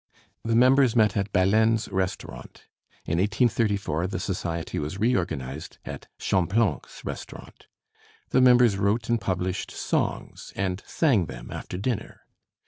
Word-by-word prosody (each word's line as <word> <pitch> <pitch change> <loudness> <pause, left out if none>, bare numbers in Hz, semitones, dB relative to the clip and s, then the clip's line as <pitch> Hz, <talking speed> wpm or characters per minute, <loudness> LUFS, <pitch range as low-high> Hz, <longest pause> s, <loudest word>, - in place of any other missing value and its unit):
The 115 0 0
members 130 0 +5
met 105 -4 +4
at 100 0 -1
Balaine's 110 +4 +3
restaurant. 95 -1 -4 0.4
In 85 +2 0
1834 100 - +1
the 95 - -4
society 85 -3 -3
was 75 +5 -4
reorganized 75 - -2
at - - -8
Champlanc's 95 +4 0
restaurant. - - -8 0.6
The 130 - +4
members 125 -4 +6
wrote 105 +4 0
and 120 -2 +1
published 95 -1 -2
songs - - -3
and 95 0 -2
sang 120 - +2
them - - -9
after 90 - -6
dinner. 105 +3 -3
100 Hz, 125 wpm, -26 LUFS, 90-115 Hz, 0.6 s, members